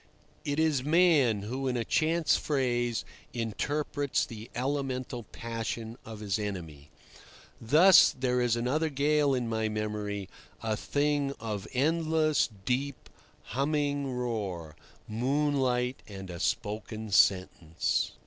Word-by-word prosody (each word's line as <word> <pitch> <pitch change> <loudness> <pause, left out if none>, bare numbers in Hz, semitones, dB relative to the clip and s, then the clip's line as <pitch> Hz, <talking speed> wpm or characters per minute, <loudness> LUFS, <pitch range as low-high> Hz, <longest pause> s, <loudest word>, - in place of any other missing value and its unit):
It 145 0 -2
is 155 -5 +2
man 150 - +4
who, 130 +5 -3
in 125 -1 0
a 115 - -1
chance 165 +1 +2
phrase, 120 -5 0 0.3
interprets 145 +5 -1
the 110 -1 -9
elemental 130 -1 -2
passion 115 0 -4
of 110 -1 -9
his 100 -1 -1
enemy. 80 -8 -6 0.7
Thus 165 +11 +7
there 125 -1 +1
is 120 -2 +2
another 135 +7 0
gale 145 0 +2
in 125 -2 -1
my 110 -1 0
memory, 105 -2 -3 0.4
a 110 -1 0
thing 145 +3 0
of 105 -3 -4
endless, 155 +1 +2 0.2
deep, 135 +2 -2 0.4
humming 145 0 0
roar, 105 - -3 0.3
moonlight, 130 +1 0
and 95 -3 -8
a 85 - -7
spoken 110 +2 -3
sentence. 90 -4 +2
125 Hz, 115 wpm, -29 LUFS, 110-145 Hz, 0.7 s, Thus